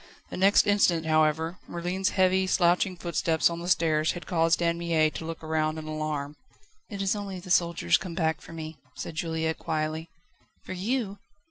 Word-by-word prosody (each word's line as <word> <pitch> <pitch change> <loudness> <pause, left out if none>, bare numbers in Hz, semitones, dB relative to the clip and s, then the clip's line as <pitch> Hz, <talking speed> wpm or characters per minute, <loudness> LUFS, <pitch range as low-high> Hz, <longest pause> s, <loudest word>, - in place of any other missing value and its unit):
The - - -5
next 195 +2 +5
instant, 185 -5 +3
however, 160 +2 +1
Merlin's 180 +3 -1
heavy, 190 0 +2
slouching 180 0 +2
footsteps 170 -1 +1
on 170 - -4
the 170 - -6
stairs 160 -3 +2
had 175 - -8
caused 165 -2 +2
Anne 170 0 +1
Mie 160 -2 +2
to 160 - -6
look 165 0 -6
round 155 0 0
in 155 - -6
alarm. 155 -1 -3 0.5
"It 200 -3 -4
is 195 +2 +1
only 200 -2 -5
the 180 0 -8
soldiers 170 - +3
come 175 -2 -7
back 160 -2 0
for - - -12
me," 160 -1 -7 0.2
said - - -6
Juliette 160 0 -2
quietly. 155 +1 -2 0.6
"For - - -5
you?" 205 +1 -2
170 Hz, 175 wpm, -27 LUFS, 160-185 Hz, 0.6 s, next